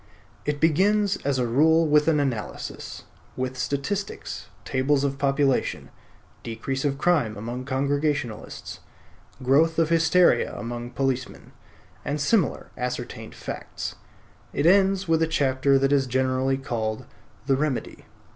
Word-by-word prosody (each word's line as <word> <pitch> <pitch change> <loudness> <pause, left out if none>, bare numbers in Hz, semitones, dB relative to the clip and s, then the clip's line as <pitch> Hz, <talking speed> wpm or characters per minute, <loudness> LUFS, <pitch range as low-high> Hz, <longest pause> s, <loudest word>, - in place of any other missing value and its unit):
It 150 -1 0
begins 195 +6 +3
as 140 -1 -1
a 125 - +1
rule 160 +7 +4
with 150 0 +4
an 155 -2 +4
analysis, 125 -7 -4 0.3
with 130 0 -2
statistics, 145 +10 -3 0.2
tables 135 +2 +1
of 140 0 -1
population, 140 -1 +1 0.5
decrease 120 +4 -4
of 140 -2 0
crime 145 - +1
among 120 +4 -5
Congregationalists, 140 -3 -2 0.6
growth 155 +6 +3
of 165 -1 +3
hysteria 165 -4 +3
among 120 +1 -5
policemen, 130 -1 -3 0.5
and 145 +1 -2
similar 160 +3 +1
ascertained 125 0 -5
facts; - - -6 0.6
it 145 - 0
ends 195 +1 +4
with 165 0 +2
a 160 - +3
chapter 135 -3 +2
that 135 +1 +2
is 135 -2 +3
generally 130 +1 +1
called 110 -5 -3 0.4
"The 135 -1 +3
Remedy." 140 -2 -3
140 Hz, 125 wpm, -25 LUFS, 130-160 Hz, 0.6 s, rule